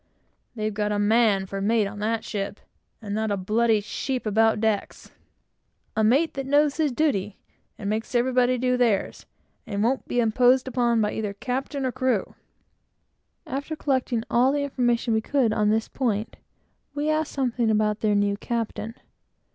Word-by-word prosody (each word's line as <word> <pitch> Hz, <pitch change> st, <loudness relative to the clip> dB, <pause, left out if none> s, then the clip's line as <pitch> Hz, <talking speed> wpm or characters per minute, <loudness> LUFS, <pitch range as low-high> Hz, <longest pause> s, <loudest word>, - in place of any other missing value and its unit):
"They've 215 Hz, -1 st, -2 dB
got 210 Hz, 0 st, -1 dB
a 205 Hz, -, 0 dB
man 205 Hz, -2 st, +3 dB
for 195 Hz, +1 st, -5 dB
mate 220 Hz, +1 st, +2 dB
of 205 Hz, +1 st, -6 dB
that 220 Hz, +1 st, -1 dB
ship, 200 Hz, -1 st, -4 dB, 0.4 s
and 205 Hz, -1 st, -4 dB
not 220 Hz, +1 st, -1 dB
a 200 Hz, -, 0 dB
bloody 215 Hz, +3 st, +2 dB
sheep 255 Hz, +5 st, -4 dB
about 220 Hz, +1 st, +3 dB
decks!" 215 Hz, -2 st, -2 dB, 0.8 s
"A 220 Hz, -, +2 dB
mate 275 Hz, +9 st, +3 dB
that 270 Hz, -1 st, -5 dB
knows 290 Hz, +1 st, +3 dB
his 310 Hz, -3 st, +1 dB
duty, 210 Hz, -8 st, 0 dB, 0.4 s
and 200 Hz, -, -6 dB
makes 220 Hz, +4 st, -2 dB
everybody 250 Hz, +1 st, +2 dB
do 250 Hz, 0 st, +1 dB
theirs, 230 Hz, -6 st, 0 dB, 0.4 s
and 205 Hz, -1 st, -1 dB
won't 255 Hz, +4 st, 0 dB
be 245 Hz, -, 0 dB
imposed 250 Hz, +3 st, +3 dB
upon 235 Hz, -3 st, +1 dB
either 210 Hz, -1 st, -3 dB
by -, -, -34 dB
captain 265 Hz, +2 st, -3 dB
or 255 Hz, -, 0 dB
crew." 255 Hz, -5 st, -1 dB, 1.1 s
After 285 Hz, +4 st, -4 dB
collecting 260 Hz, -6 st, -1 dB
all 250 Hz, +3 st, +3 dB
the 290 Hz, 0 st, 0 dB
information 240 Hz, -4 st, 0 dB
we 220 Hz, -, +2 dB
could 255 Hz, -2 st, +1 dB
get -, -, -1 dB
on 210 Hz, -1 st, +2 dB
this 220 Hz, +1 st, +1 dB
point, 225 Hz, -4 st, -2 dB, 0.6 s
we 295 Hz, +1 st, -1 dB
asked 310 Hz, 0 st, -1 dB
something 245 Hz, -4 st, 0 dB
about 215 Hz, 0 st, +1 dB
their 210 Hz, -1 st, +1 dB
new 205 Hz, 0 st, +1 dB
captain. 225 Hz, -1 st, -4 dB
230 Hz, 170 wpm, -25 LUFS, 210-255 Hz, 1.1 s, man